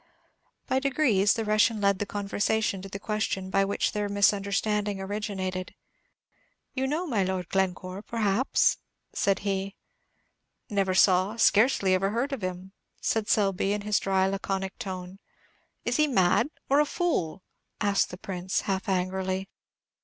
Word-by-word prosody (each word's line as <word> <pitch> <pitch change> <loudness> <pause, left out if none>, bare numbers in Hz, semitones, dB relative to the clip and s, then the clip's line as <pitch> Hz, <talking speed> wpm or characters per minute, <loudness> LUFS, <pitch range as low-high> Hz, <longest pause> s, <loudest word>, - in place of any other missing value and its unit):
By 260 - +1
degrees 255 -8 +3
the 225 - -2
Russian 215 +1 +3
led 200 -1 +2
the 205 - -2
conversation 205 0 -1
to 195 - -8
the 200 - -5
question 200 -2 -2
by 195 0 +3
which 200 +1 0
their 210 -1 -2
misunderstanding 205 0 +1
originated. 190 -2 -4 1.0
"You 265 0 -1
know 310 +6 -1
my 230 - +1
Lord 185 -2 -3
Glencore, 185 0 -1
perhaps?" 225 +2 +1 0.4
said 195 -1 +1
he. 195 0 -2 1.0
"Never 195 -2 +1
saw, 190 +3 +4
scarcely 210 -3 +4
ever 190 +1 +2
heard 245 +7 -1
of 265 - -4
him," 185 +1 -5 0.3
said 220 -2 0
Selby, 195 -1 +2
in 210 - -2
his 210 0 +1
dry, 190 -1 +1
laconic 195 0 -3
tone. 185 0 -6 0.7
"Is 240 - 0
he 305 0 +4
mad, 230 +1 +3 0.2
or 280 +2 +4
a 300 - +4
fool?" 190 - -1 0.4
asked 200 -2 +2
the 180 - -8
Prince, 185 -1 -3
half 195 +1 -2
angrily. 190 +1 -1
200 Hz, 145 wpm, -27 LUFS, 190-215 Hz, 1.0 s, saw